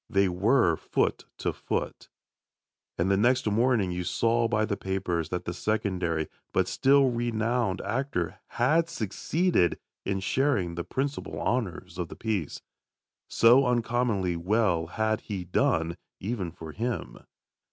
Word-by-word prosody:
They 100 0 +3
were 90 - +3
foot - - -1
to - - -1
foot. - - -4 0.9
And 85 - +1
next 125 +2 +3
morning 110 -2 +2
you 90 0 -2
saw 115 +6 +1
by 110 -1 +1
the 105 - -1
papers 90 -5 -2
that 90 - -3
the 85 - -3
secondary, 90 -5 -1 0.3
but - - +2
still 135 -1 +4
renowned, 120 -3 0
actor, 110 -5 -2
had 155 +8 +2
succeeded 150 - +1 0.3
in 95 -1 -1
sharing 100 -4 +1
the 85 0 -3
principal 140 +7 -3
honours 95 -7 -2
of 85 - -2
the - - -9
piece. 105 -9 -3 0.6
So 125 +4 +5
uncommonly 115 -6 +1
well 90 -2 +1
had 110 +4 -1
he 100 -4 -5
done, 85 -1 +1 0.2
even 100 -3 -3
for 80 -1 -9
him. 120 +7 -4
105 Hz, 130 wpm, -28 LUFS, 90-120 Hz, 0.9 s, So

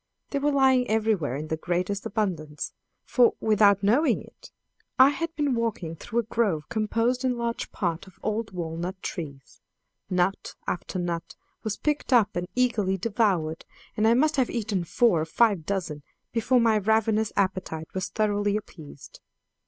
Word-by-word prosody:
They 280 - 0
were 295 +1 +1
lying 265 -3 +4
everywhere 215 - +1
in 155 +2 -5
the 160 - -1
greatest 180 +4 -2
abundance; 170 -8 -3 0.3
for, 245 -2 +4
without 205 -2 +4
knowing 245 +11 +3
it, - - -16 0.5
I 260 +1 +8
had 330 +3 -3
been 290 -3 +1
walking 220 -8 -2
through 230 +8 -2
a - - -12
grove 205 -9 0
composed 230 +3 0
in 250 -2 +1
large 235 0 -3
part 175 -1 -2
of 190 - -17
old 215 +1 -1
walnut 175 +1 -4
trees. 140 -6 -7 0.5
Nut 185 +1 0
after 180 +1 -3
nut 170 -2 -3 0.3
was 215 -2 -3
picked 295 -2 -1
up 225 -5 +4
and 175 0 -2
eagerly 220 -7 +1
devoured, 190 -6 0 0.3
and 215 +1 +2
I 230 - +5
must 305 +4 +2
have 260 -2 +2
eaten 210 -6 -2
four 190 -2 +3
or - - -1
five 195 -1 +2
dozen 170 -7 -2 0.3
before 240 +2 +2
my 225 -2 +3
ravenous 220 +1 +2
appetite 185 -5 -1
was 185 -1 -3
thoroughly 205 -1 +1
appeased. 155 -9 -11
210 Hz, 160 wpm, -26 LUFS, 175-235 Hz, 0.5 s, I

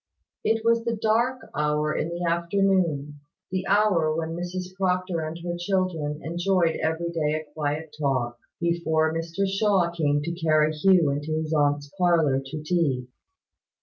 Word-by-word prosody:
It 225 0 +1
was 230 0 +3
the 235 0 -1
dark 235 +4 0
hour 150 +1 0
in 155 - -1
the 170 +1 -4
afternoon 170 -4 +1 0.3
the 185 0 -2
hour 190 -7 +3
when 160 0 -2
Mrs 180 +1 -5
Proctor 185 -2 0
and 155 +1 -4
her 175 - -2
children 175 -5 -1
enjoyed 175 0 +1
every 160 +2 -1
day 155 -2 0
a 155 0 -4
quiet 150 0 -3
talk, 125 -4 -1 0.2
before 160 -2 +1
Mr 165 +4 -2
Shaw 195 -3 +2
came 145 -3 0
to 170 - -2
carry 155 -2 +2
Hugh 170 -1 +4
into 145 +2 -3
his 155 0 -3
aunt's 145 -1 +1
parlour 165 -7 +3
to 150 +3 -7
tea. 150 -7 0
165 Hz, 150 wpm, -25 LUFS, 150-185 Hz, 0.3 s, Hugh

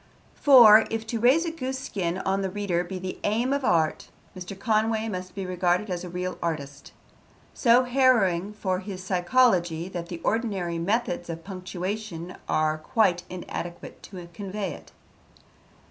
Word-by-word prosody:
For, 230 -6 +8
if 225 0 -3
to 225 0 -3
raise 265 +9 +4
a 335 - -2
goose 265 -4 -4
skin 185 -9 -3
on 190 +1 -1
the 190 - -1
reader 185 -3 -1
be 185 +1 -6
the 185 0 -6
aim 235 +6 +1
of 280 -1 -1
art, 165 -8 +1 0.3
Mr. 185 +1 -8
Conway 220 +1 +1
must 185 -3 -6
be 195 -1 -4
regarded 180 +2 0
as 175 0 -3
a 180 - -6
real 180 +1 -4
artist. 140 -4 -4 0.6
So 245 0 +4
harrowing 225 -7 +2
is 185 0 -1
his 190 -3 -6
psychology 180 -3 +2
that 175 -2 -6
the 175 - -5
ordinary 195 -7 -1
methods 195 -1 -1
of 165 0 -6
punctuation 185 -1 -5
are 155 0 +1
quite 180 0 +1
inadequate 175 -1 -7
to 180 -3 -9
convey 200 -1 -4
it. - - -13
190 Hz, 155 wpm, -26 LUFS, 175-220 Hz, 0.6 s, For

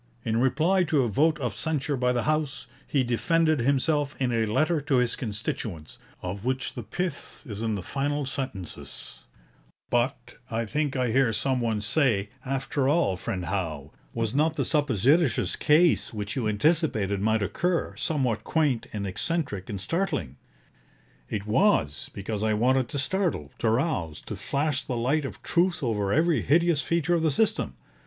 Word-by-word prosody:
' - - -33
In 110 0 +1
reply 160 +9 +3
to 150 -4 +2
a - - +1
vote 150 +8 +2
of 125 -3 -2
censure 150 -2 -1
by 125 -1 +1
the 120 -1 0
House, 155 -5 -1 0.2
he 135 -3 +2
defended 155 +6 +2
himself 140 +3 +1
in 130 -2 +1
a 115 -2 +1
letter 155 +8 +2
to 145 -1 0
his 125 -2 +2
constituents, 105 - -5 0.2
of 95 +3 -4
which 130 +1 -1
the 125 - -5
pith 175 - -4
is 105 -5 -5
in 110 -2 0
the 95 - -5
final 145 +4 -1
sentences: 130 - -5 0.7
'"But," 120 +2 -1
I 115 0 -1
think 145 +5 -1
I 125 -3 +1
hear 130 -1 +3
some 130 +2 0
one 110 -3 0
say, 110 -5 +1
"after 135 0 -1
all, 150 - +2
friend 90 0 -4
Howe, 80 -6 -3 0.2
was 115 -1 -2
not 155 +3 +2
the - - 0
supposititious 135 - +2
case, 160 +2 +3
which 105 -3 -4
you 125 -5 0
anticipated 105 - +1
might 110 0 +2
occur, 175 - -1
somewhat 130 -8 -1
quaint 145 -7 +1
and 100 -2 -3
eccentric 105 - -2
and 100 - -4
startling?" 95 - -2 0.9
It 105 -1 -3
was, 110 - +2
because 105 +1 -4
I 110 0 +2
wanted 130 +3 +2
to - - -4
startle, 140 - -1
to 115 - +2
rouse, 110 - 0
to - - -6
flash 145 -1 -1
the 125 - -3
light 135 +6 +1
of - - -7
truth 175 -2 +1
over 105 -5 0
every 160 +4 +3
hideous 170 0 +3
feature 170 +1 +1
of 170 - +2
the 160 - +3
system. 215 +9 0
130 Hz, 170 wpm, -27 LUFS, 110-155 Hz, 0.9 s, reply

